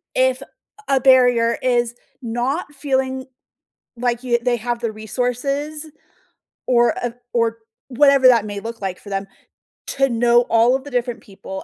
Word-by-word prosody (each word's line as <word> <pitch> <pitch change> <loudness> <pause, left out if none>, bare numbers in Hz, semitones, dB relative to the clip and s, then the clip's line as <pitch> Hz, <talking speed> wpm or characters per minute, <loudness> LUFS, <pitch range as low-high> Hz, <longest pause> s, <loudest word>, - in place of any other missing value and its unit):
if 260 0 +2
a - - -9 0.4
a 275 -1 +3
barrier 245 -3 +4
is 240 -2 +1 0.3
not 255 +6 -3
feeling 265 -2 -2 0.7
like 245 0 -1
you 240 -2 +1
they 245 -1 +1
have 240 +1 -3
the 230 -2 -2
resources 255 +8 -3 0.8
or 240 -2 +4
of 240 -1 -3 0.2
or 230 -1 +1 0.3
whatever 275 0 +5
that 235 -4 +5
may 205 -1 -5
look 230 +3 -7
like 190 -2 -4
for 205 - -12
them, 195 0 -3 0.6
to 270 0 +1
know 240 0 +3
all 230 +3 +4
of 265 - -3
the 285 - -10
different 245 -2 -2
people 190 -1 -9
245 Hz, 155 wpm, -20 LUFS, 230-260 Hz, 0.8 s, whatever